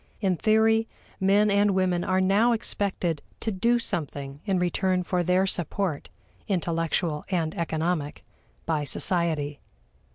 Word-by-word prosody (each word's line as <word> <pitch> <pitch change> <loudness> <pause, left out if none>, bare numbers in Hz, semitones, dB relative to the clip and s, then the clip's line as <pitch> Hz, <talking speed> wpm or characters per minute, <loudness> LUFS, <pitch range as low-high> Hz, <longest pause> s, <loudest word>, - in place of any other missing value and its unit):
In 190 -4 +1
theory, 220 +3 +3 0.3
men 200 +2 +3
and 200 -1 +3
women 180 -2 +1
are 185 - +1
now 200 +6 +3
expected 190 -7 -1 0.2
to 220 - -2
do 230 +5 +2
something 145 -9 -4
in 195 -3 +1
return 180 +1 +1
for 180 0 0
their 180 +2 +2
support 180 -3 -2 0.4
intellectual 165 -3 -1
and 165 -4 0
economic 160 -2 -2 0.4
by 155 -3 0
society. 155 -3 -1
180 Hz, 125 wpm, -26 LUFS, 165-200 Hz, 0.4 s, theory